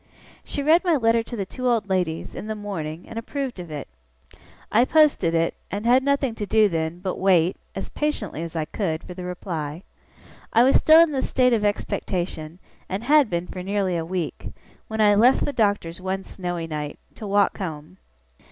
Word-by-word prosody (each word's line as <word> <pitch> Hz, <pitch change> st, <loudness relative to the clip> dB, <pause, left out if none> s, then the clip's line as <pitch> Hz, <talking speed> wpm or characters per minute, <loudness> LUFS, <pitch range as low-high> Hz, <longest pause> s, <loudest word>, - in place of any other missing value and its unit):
She 285 Hz, -, -4 dB
read 320 Hz, +5 st, +5 dB
my 345 Hz, -3 st, +3 dB
letter 230 Hz, -3 st, +3 dB
to 235 Hz, +2 st, -7 dB
the 200 Hz, -4 st, -3 dB
two 255 Hz, +6 st, -4 dB
old 225 Hz, -4 st, +1 dB
ladies, 180 Hz, -4 st, -1 dB
in -, -, -7 dB
the 220 Hz, -, -3 dB
morning, 175 Hz, -6 st, -6 dB
and 225 Hz, -, -5 dB
approved 265 Hz, -1 st, -4 dB
of 175 Hz, -2 st, -7 dB
it. 150 Hz, -2 st, -6 dB, 0.8 s
I 230 Hz, +3 st, +5 dB
posted 275 Hz, -, +3 dB
it, 165 Hz, 0 st, +1 dB, 0.2 s
and 205 Hz, +3 st, -4 dB
had 250 Hz, +2 st, +5 dB
nothing 275 Hz, -2 st, +1 dB
to 205 Hz, -, -2 dB
do 220 Hz, 0 st, +4 dB
then, 165 Hz, -1 st, -3 dB
but 185 Hz, -1 st, -3 dB
wait, 180 Hz, -2 st, +3 dB, 0.2 s
as -, -, -5 dB
patiently 265 Hz, -, -3 dB
as 170 Hz, 0 st, -6 dB
I 160 Hz, -1 st, -1 dB
could, 160 Hz, -3 st, -3 dB
for 180 Hz, -, -8 dB
the 180 Hz, 0 st, -7 dB
reply. 170 Hz, -3 st, -5 dB, 0.7 s
I 230 Hz, -, +6 dB
was 265 Hz, -, +5 dB
still 315 Hz, +1 st, +7 dB
in 335 Hz, -2 st, +4 dB
this 265 Hz, -2 st, -2 dB
state 250 Hz, -1 st, +3 dB
of 220 Hz, -3 st, +1 dB
expectation, 175 Hz, -5 st, -2 dB, 0.3 s
and 190 Hz, +4 st, -3 dB
had 290 Hz, -1 st, +4 dB
been, 170 Hz, 0 st, -2 dB
for 180 Hz, 0 st, -7 dB
nearly 195 Hz, -1 st, -1 dB
a 165 Hz, -, -1 dB
week; 170 Hz, -1 st, -4 dB, 0.4 s
when 220 Hz, 0 st, -2 dB
I 205 Hz, -1 st, +6 dB
left 235 Hz, +6 st, +4 dB
the 285 Hz, -, -3 dB
Doctor's 200 Hz, -6 st, 0 dB
one 190 Hz, +1 st, -3 dB
snowy 175 Hz, -3 st, -5 dB
night, 150 Hz, -2 st, -5 dB, 0.2 s
to 215 Hz, -, -8 dB
walk 200 Hz, +1 st, +2 dB
home. 165 Hz, -1 st, -6 dB
195 Hz, 200 wpm, -24 LUFS, 170-235 Hz, 0.8 s, still